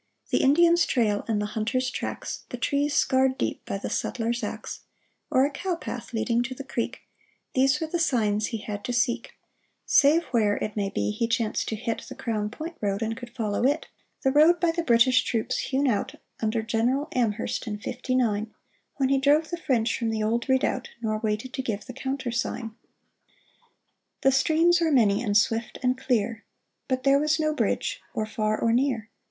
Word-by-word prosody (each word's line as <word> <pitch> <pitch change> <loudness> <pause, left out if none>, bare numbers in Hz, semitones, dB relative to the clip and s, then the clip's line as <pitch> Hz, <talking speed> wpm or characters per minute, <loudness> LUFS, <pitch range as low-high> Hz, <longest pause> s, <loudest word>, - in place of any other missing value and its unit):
The - - +3
Indian's 340 +5 +5
trail 210 -4 +1
and 220 -2 0
the 210 - -1
hunter's 250 +4 -1
tracks, - - -5
The - - -5
trees 285 +1 0
scarred 260 0 +3
deep - - -2
by - - -2
the 195 - -5
settler's 235 +1 -2
axe, 210 - -5 0.5
Or 260 +1 +4
a 290 - -1
cow 360 +4 -2
path 250 -7 -7
leading 235 +1 +1
to 250 +2 -4
the 275 - -7
creek, 240 -3 -3 0.3
— - - -41
These 270 +1 +3
were 320 - -1
the 335 +2 -2
signs 215 -9 +1
he 230 - -3
had 205 -1 -6
to 245 - -2
seek; 245 -1 0 0.5
Save 305 +4 +5
where, 215 -5 +2
it 210 - -4
may 200 -2 -1
be, 200 - -1
he 230 +2 -1
chanced 230 -2 0
to 220 - -2
hit 230 +1 -3
The - - -8
Crown 215 -3 -2
Point 320 +8 -7
road 200 +1 -1
and 225 0 -2
could 245 0 -9
follow 225 -3 -2
it— 285 +5 +1 0.3
The 265 - +3
road 315 +5 +5
by 335 0 +2
the 340 +1 -2
British 255 -2 +4
troops 225 -2 -1
hewn 275 +1 0
out 220 -5 0 0.2
Under 220 0 0
General 240 +6 0
Amherst 230 -1 -1
in 210 -1 -3
fifty 250 +4 -3
nine, 220 -3 +1 0.4
When 265 -2 +1
he 275 0 +3
drove 295 +4 +3
the 345 - -2
French 245 -9 +1
from 230 -2 0
the 220 -1 -1
old 235 +4 -1
redoubt, 260 -1 +1
Nor 215 -1 0
waited 220 +3 -2
to 265 - -2
give 215 -5 -4
the 255 - -8
countersign! 255 -3 -3 1.5
The 270 - +4
streams 330 +5 +3
were 325 -1 +2
many 215 -6 +4
and 205 -4 +2
swift 225 0 0
and 250 0 +2
clear; 230 -4 -1 0.4
But 255 -1 -1
there 275 +1 +5
was 305 +2 +1
no 310 -1 +1
bridge, - - -1
or 215 - 0
far 215 0 -1
or 230 0 +2
near. 240 -3 0
245 Hz, 195 wpm, -26 LUFS, 220-275 Hz, 1.5 s, Indian's